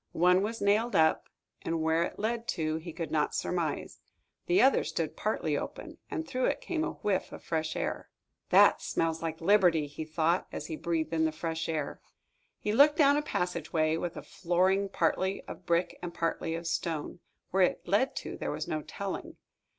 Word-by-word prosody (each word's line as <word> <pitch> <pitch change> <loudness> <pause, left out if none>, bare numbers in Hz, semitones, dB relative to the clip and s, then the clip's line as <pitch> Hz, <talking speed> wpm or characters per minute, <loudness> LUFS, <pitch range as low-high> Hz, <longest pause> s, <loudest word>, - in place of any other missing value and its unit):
One 180 +2 +5
was 220 +1 -3
nailed 215 +4 +2
up, 160 -1 +3 0.3
and 165 0 -2
where 160 +1 +2
it 170 - -2
led 230 +2 -2
to, 155 -1 0
he 165 +1 -7
could 165 0 -5
not 150 -1 +1
surmise. 170 -4 -2 0.5
The 360 +2 +4
other 270 -6 +5
stood - - -3
partly - - -1
open, - - -6
and 320 -1 -4
through 255 -2 0
it - - 0
came 330 -3 -2
a - - -2
whiff 200 -3 0
of - - -10
fresh 160 -1 -2
air. - - -3 0.4
"That - - +6
smells 165 -1 -1
like 160 -1 -3
liberty," 175 -4 +4
he 145 +2 -6
thought, 160 +3 0
as - - -5
he 160 - -4
breathed 165 0 -2
in 160 -1 +2
the 160 - +1
fresh 160 +1 -3
air. 155 -3 -3 0.6
He 210 - -2
looked 295 +5 +6
down 285 -2 +6
a 295 - +2
passageway, 165 - -1
with 170 +1 -4
a - - -6
flooring 190 +2 +1
partly 190 +2 0
of 180 - -10
brick 170 +1 +1
and 175 -1 -4
partly 165 -1 -2
of 170 +1 -6
stone. 165 -1 -2 0.3
Where 190 - +2
it 180 - +1
led 210 +9 +2
to, - - -5
there - - -3
was - - -3
no 155 - -2
telling. 200 +5 -6
170 Hz, 190 wpm, -30 LUFS, 160-200 Hz, 0.6 s, That